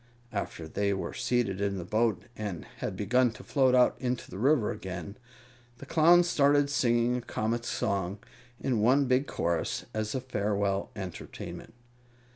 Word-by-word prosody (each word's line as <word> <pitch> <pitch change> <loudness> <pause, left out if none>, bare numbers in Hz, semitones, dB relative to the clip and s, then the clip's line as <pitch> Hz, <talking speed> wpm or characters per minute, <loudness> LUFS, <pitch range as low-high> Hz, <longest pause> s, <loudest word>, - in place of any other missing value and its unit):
After 90 -5 -4
they 100 +4 0
were 95 - -4
seated 120 -6 0
in 100 -1 0
the 90 - -5
boat 110 +1 +1
and 100 -7 -5
had - - -4
begun 125 +5 +3
to - - -12
float 130 -3 +3
out 125 -1 +5
into 125 -1 -3
the 95 - -6
river 130 -2 +3
again, 90 +1 -6 0.6
the - - -10
Clowns 170 +2 +5
started 145 -2 +3
singing 120 -2 +2
a - - -4
comic 115 0 -2
song, 100 -4 -1 0.4
in 120 -5 0
one 130 +5 +4
big 130 +2 +2
chorus, 85 -1 -1
as 110 +1 -2
a - - +1
farewell 100 -5 -1
entertainment. 95 +3 -8
110 Hz, 155 wpm, -29 LUFS, 100-130 Hz, 0.6 s, out